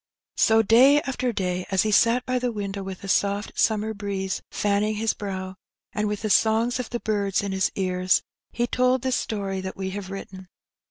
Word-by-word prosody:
So 225 0 +4
day 260 +7 +6
after 255 -3 -2
day 180 -4 -2
as 190 -1 +2
he 215 - 0
sat 235 +4 +3
by 255 0 0
the 245 -1 -1
window, 200 -2 -4
with 190 -1 -7
the 200 - -8
soft 200 +1 0
summer 220 0 +1
breeze 200 -2 -3
fanning 210 +1 0
his 220 +1 0
brow, 190 -2 -6 0.4
and 210 0 -1
with 210 0 -3
the 215 - -1
songs 225 +4 +3
of 250 - -4
the 240 - -3
birds 200 -3 0
in 200 - -3
his 190 0 0
ears, 185 -1 +1 0.3
he 240 - 0
told 255 +1 +1
the 260 - 0
story 200 -5 -2
that 190 0 -6
we 190 -1 -3
have 195 -1 -6
written. 190 -1 -8
205 Hz, 200 wpm, -24 LUFS, 190-230 Hz, 0.4 s, day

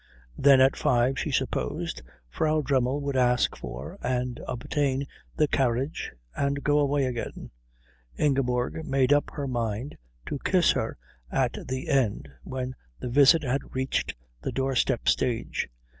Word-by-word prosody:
Then 135 -1 +6
at 135 +1 +5
five, 125 +2 +2
she - - -2
supposed, 60 0 -2 0.3
Frau 155 - +1
Dremmel 135 0 +1
would 140 -1 -2
ask 125 -1 +3
for 65 +3 -7
and 125 -1 -1
obtain 135 +2 -1 0.3
the 150 - +4
carriage 135 +2 0 0.2
and 140 0 -1
go 150 0 +3
away 145 -1 +2
again. 120 -2 -5 0.7
Ingeborg 135 0 +1
made 135 -1 +3
up 145 - +2
her 140 -2 -3
mind 120 +1 -3 0.3
to - - -4
kiss - - +4
her - - -2 0.3
at - - +1
the 130 0 -3
end 115 - +1
when 130 0 -4 0.3
the - - -4
visit 145 +5 +6
had 135 0 -2
reached 130 +1 -1 0.3
the - - -3
doorstep 130 -2 0
stage. 120 - 0
130 Hz, 140 wpm, -27 LUFS, 125-140 Hz, 0.7 s, Then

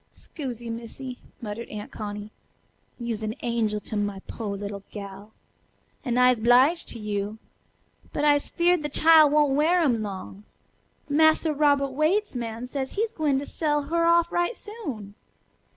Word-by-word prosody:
"'Scusie, 240 -5 -7
Missy," 240 +2 -7 0.2
muttered 225 +1 -6
Aunt 210 -1 -7
Connie; 210 0 -6 0.7
"you'se 235 -2 -3
an 215 +1 -3
angel 225 -3 0
to 215 - -7
my 205 -1 -1
po' 225 -3 -5
little 200 0 -5
gal. 200 0 -9 0.7
An' 245 -4 -1
I'se 250 -1 +5
'bliged 255 +9 +4
to - - -7
you. 210 0 -3 0.7
But 295 - -1
I'se 290 -1 +3
feared 350 -1 +2
the 295 - -3
chile 315 +1 +6
won't 295 -1 +3
wear 325 +5 +3
'em 245 -8 +2
long. 195 0 -7 0.6
Massa 315 +1 +4
Robert 285 -2 +3
Waite's 320 +10 +1
man 235 -1 -4
sez 265 +1 -4
he's 440 +2 -1
gwine 285 -3 0
sell 295 -2 0
her 335 +3 +1
off 340 0 +4
right 350 +7 0
soon." 280 - -7
255 Hz, 150 wpm, -26 LUFS, 215-305 Hz, 0.7 s, chile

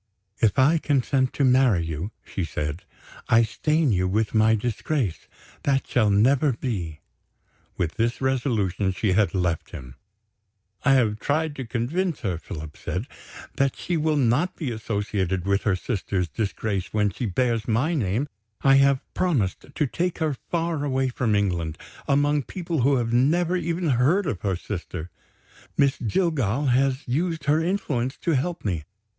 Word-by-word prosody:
"If 110 -4 +2
I 150 +5 +5
consent 135 -3 +1
to 140 - 0
marry 125 -9 +4
you," 80 +4 -4 0.2
she 95 - -4
said, 75 +3 -4 0.4
"I 115 +1 +6
stain 150 +5 +1
you 90 -2 +1
with 105 +3 0
my 110 0 +4
disgrace; 120 - -2 0.3
that 135 -1 +1
shall 110 -4 +2
never 130 +8 +3
be." 90 - -4 0.8
With 85 -2 -2
this 115 +1 0
resolution, 115 -8 0
she 95 +2 0
had 100 +1 +2
left 90 -3 -1
him. 65 -3 -9 0.9
"I 135 - +5
have 110 -5 +2
tried 155 +3 0
to 130 -3 -5
convince 145 +10 -1
her," 95 -8 -2
Philip 80 -2 -8
said, 95 +6 -3 0.5
"that 135 -1 +2
she 175 - -3
will 155 -1 +1
not 140 +8 +2
be 145 -7 -3
associated 100 -4 -2
with 100 0 +1
her 100 -3 +3
sister's 95 -2 -2
disgrace 100 -1 -3
when 105 -1 +1
she 115 +6 -3
bears 115 +2 0
my 125 +9 +1
name; 120 - 0 0.4
I 135 0 +6
have 135 -1 +4
promised 135 - 0
to 150 - +1
take 170 +6 -2
her 155 -3 0 0.2
far 165 -3 -1
away 135 -2 0
from 120 -3 0
England, 85 -6 0 0.3
among 145 +1 +3
people 170 -1 -3
who 140 +3 +4
have 120 -2 0
never 165 +8 +3
even 170 0 -1
heard 145 +11 +3
of 115 - -3
her 95 -3 0
sister. 90 -2 -6 0.7
Miss 140 -2 +3
Jillgall 135 - 0
has 135 +2 +1
used 160 +4 -1
her 150 +3 +3
influence 145 -9 -1
to 170 - -1
help 165 +3 -1
me. 85 -7 -2
125 Hz, 160 wpm, -25 LUFS, 100-145 Hz, 0.9 s, I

